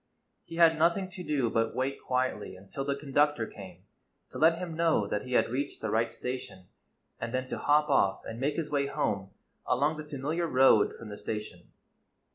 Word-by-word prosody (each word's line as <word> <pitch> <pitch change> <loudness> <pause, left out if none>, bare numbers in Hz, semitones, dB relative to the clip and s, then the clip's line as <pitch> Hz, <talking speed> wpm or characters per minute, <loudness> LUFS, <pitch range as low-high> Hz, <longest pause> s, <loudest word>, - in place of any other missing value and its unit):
He 165 - -9
had 165 -1 +5
nothing 175 +4 +2
to 180 0 -8
do 140 -8 0
but 115 0 0
wait 135 +2 -2
quietly 125 -6 -1
until 95 +8 -6
the 140 0 -1
conductor 145 -3 +1
came 95 -4 -11 0.5
to - - -7
let 165 +1 +5
him 175 -2 -5
know 165 -10 +2
that 105 +1 -2
he 125 - -4
had 120 - +3
reached 135 +3 -3
the 110 - -3
right 115 +1 +1
station, 125 -7 -6 0.5
and 115 - -4
then 130 0 -1
to - - -3
hop 150 +1 +3
off 135 -9 +2
and 115 +1 -6
make 145 +3 0
his 155 -3 -3
way 140 -1 +1
home 100 -9 -1 0.4
along 145 +5 +2
the 155 - -5
familiar 150 +4 -2
road 130 -6 +5
from 115 - -9
the 105 - -8
station. 105 -5 -6
135 Hz, 195 wpm, -29 LUFS, 115-150 Hz, 0.5 s, had